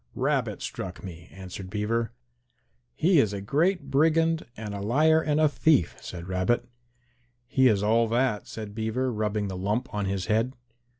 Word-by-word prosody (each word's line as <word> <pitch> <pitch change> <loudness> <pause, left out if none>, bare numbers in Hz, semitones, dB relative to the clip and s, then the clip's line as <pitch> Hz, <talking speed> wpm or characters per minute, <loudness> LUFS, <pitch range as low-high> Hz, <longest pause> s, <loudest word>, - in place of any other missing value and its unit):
"Rabbit - - -1
struck 90 -1 -6
me," 85 -2 -9
answered 95 0 -8
Beaver. 110 +3 -1 0.8
"He 175 0 +4
is 105 -6 +2
a 100 - -3
great 165 - 0
brigand 160 +3 +2
and 105 -2 -5
a 100 - -5
liar 155 +9 +3
and 150 -1 0
a 155 - +5
thief," 150 - +2
said 85 -1 -8
Rabbit. 95 +5 0 0.8
"He 130 +2 +3
is 105 -4 +2
all 115 +2 +3
that," 115 -2 0
said 105 -2 -7
Beaver, 115 +4 -1
rubbing 105 -1 -1
the 95 - -5
lump 100 +6 -2
on 105 -1 -1
his 95 -1 -2
head. 115 +4 +1
110 Hz, 165 wpm, -27 LUFS, 100-135 Hz, 0.8 s, a